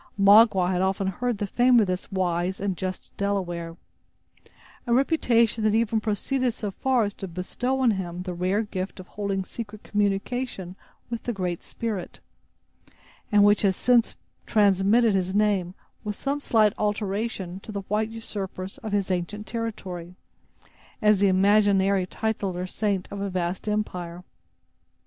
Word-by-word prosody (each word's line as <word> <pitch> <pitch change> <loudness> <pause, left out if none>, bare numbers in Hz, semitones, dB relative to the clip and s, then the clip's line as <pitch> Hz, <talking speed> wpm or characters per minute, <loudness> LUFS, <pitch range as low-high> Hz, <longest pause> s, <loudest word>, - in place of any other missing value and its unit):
Magua 200 -2 +6
had 180 -1 0
often 195 +1 0
heard 240 +5 -1
the 205 - -2
fame 245 +4 +4
of 215 - +4
this 185 -1 -3
wise 180 0 -1
and 195 -2 -1
just 185 +1 -5
Delaware; 175 -4 -2 1.1
a 235 - +2
reputation 235 -6 +2
that 215 0 +3
even 225 -1 +1
proceeded 235 +4 0
so 205 -2 -4
far 255 +3 +1
as 205 -1 -2
to 195 - -7
bestow 245 +9 -2
on 250 -3 +4
him 180 -3 -4
the 180 -1 -4
rare 185 +5 0
gift 195 -2 -5
of 185 - -11
holding 200 -2 -2
secret 215 +1 -8
communion 205 -1 -2 0.4
with 230 -1 -3
the 240 - -3
Great 180 -4 -3
Spirit, 210 -6 -5 1.1
and 205 -1 +6
which 205 0 +5
has 195 -2 +2
since 240 +1 +3 0.3
transmitted 205 +2 +4
his 190 0 0
name, 200 -4 +1 0.3
with 210 -2 -3
some 280 +5 -2
slight 215 -7 +3
alteration, 205 -2 -2
to 215 - -10
the 200 -1 -3
white 210 +3 -1
usurpers 195 -4 -6
of 215 -2 -6
his 195 -2 0
ancient 185 +4 -3
territory, 185 -7 -5 0.8
as 210 -2 +4
the 200 - +4
imaginary 195 -1 +3
tutelar 195 -4 -2
saint 200 -1 -1
of 200 - -5
a 200 - -2
vast 180 +2 -2
empire. 180 -5 -3
200 Hz, 150 wpm, -25 LUFS, 185-220 Hz, 1.1 s, Magua